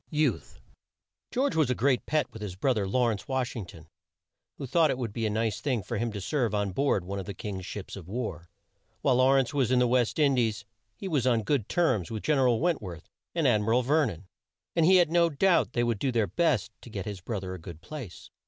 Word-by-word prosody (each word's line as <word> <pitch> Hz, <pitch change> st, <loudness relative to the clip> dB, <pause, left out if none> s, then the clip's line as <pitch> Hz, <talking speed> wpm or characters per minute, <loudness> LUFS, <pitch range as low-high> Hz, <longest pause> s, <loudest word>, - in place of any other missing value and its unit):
YOUTH. 150 Hz, -6 st, -1 dB, 0.7 s
George 270 Hz, +3 st, 0 dB
was 155 Hz, -5 st, +3 dB
a 125 Hz, -, +1 dB
great 130 Hz, +1 st, +1 dB
pet 155 Hz, 0 st, +2 dB
with 110 Hz, -, -9 dB
his 100 Hz, -4 st, -5 dB
bro 130 Hz, +8 st, +1 dB
ther, 105 Hz, -4 st, -1 dB
Law 120 Hz, +4 st, +2 dB
rence 100 Hz, -, -8 dB
Wash 130 Hz, -2 st, -1 dB
ing 105 Hz, -6 st, -5 dB
ton, 80 Hz, -2 st, -13 dB, 0.7 s
who 140 Hz, -, -5 dB
thought 160 Hz, +4 st, +3 dB
it -, -, 0 dB
would 120 Hz, -5 st, -4 dB
be 115 Hz, -1 st, -1 dB
a -, -, -1 dB
nice 110 Hz, -1 st, -1 dB
thing 125 Hz, -7 st, -1 dB
for 120 Hz, +5 st, -4 dB
him 115 Hz, 0 st, -1 dB
to 105 Hz, -, -5 dB
serve 115 Hz, +1 st, -1 dB
on 100 Hz, -1 st, 0 dB
board 100 Hz, -4 st, +1 dB
one 100 Hz, +2 st, -4 dB
of 95 Hz, -, -7 dB
the 100 Hz, -, -5 dB
King's 95 Hz, -1 st, -6 dB
ships 100 Hz, -1 st, -7 dB
of 95 Hz, -4 st, -10 dB
war. 95 Hz, -6 st, -5 dB, 0.5 s
While 130 Hz, -3 st, +3 dB
Law 130 Hz, +1 st, +5 dB
rence 135 Hz, 0 st, +2 dB
was 135 Hz, -4 st, +1 dB
in 130 Hz, -, +3 dB
the 125 Hz, -, +4 dB
West 120 Hz, -1 st, +1 dB
In 145 Hz, -3 st, +4 dB
dies 115 Hz, -3 st, 0 dB, 0.3 s
he 195 Hz, -, -6 dB
was 145 Hz, -8 st, +1 dB
on 115 Hz, -3 st, +2 dB
good 130 Hz, -4 st, 0 dB
terms 130 Hz, -, +1 dB
with 110 Hz, -2 st, -5 dB
Gen 150 Hz, -3 st, +2 dB
er 130 Hz, -, +4 dB
al 120 Hz, -2 st, +2 dB
Went 170 Hz, -3 st, +1 dB
worth 85 Hz, -5 st, -9 dB, 0.2 s
and -, -, +2 dB
Ad 105 Hz, -, +3 dB
mi 105 Hz, -, -4 dB
ral 120 Hz, +3 st, +3 dB
Ver 145 Hz, +3 st, +3 dB
non, 90 Hz, -2 st, -8 dB, 0.5 s
and 165 Hz, -1 st, +4 dB
he 190 Hz, -, +7 dB
had 175 Hz, -3 st, +4 dB
no 170 Hz, 0 st, +4 dB
doubt 170 Hz, 0 st, +2 dB
they 120 Hz, -, +1 dB
would 115 Hz, -3 st, 0 dB
do 135 Hz, -, 0 dB
their 115 Hz, -3 st, +2 dB
best 110 Hz, -, +1 dB
to -, -, -12 dB
get 100 Hz, -4 st, -5 dB
his 100 Hz, -4 st, -6 dB
bro 105 Hz, +2 st, -3 dB
ther 95 Hz, -1 st, -6 dB
a 95 Hz, -, -7 dB
good 85 Hz, -1 st, -10 dB
place. 135 Hz, -, -9 dB
120 Hz, 260 wpm, -28 LUFS, 100-140 Hz, 0.7 s, he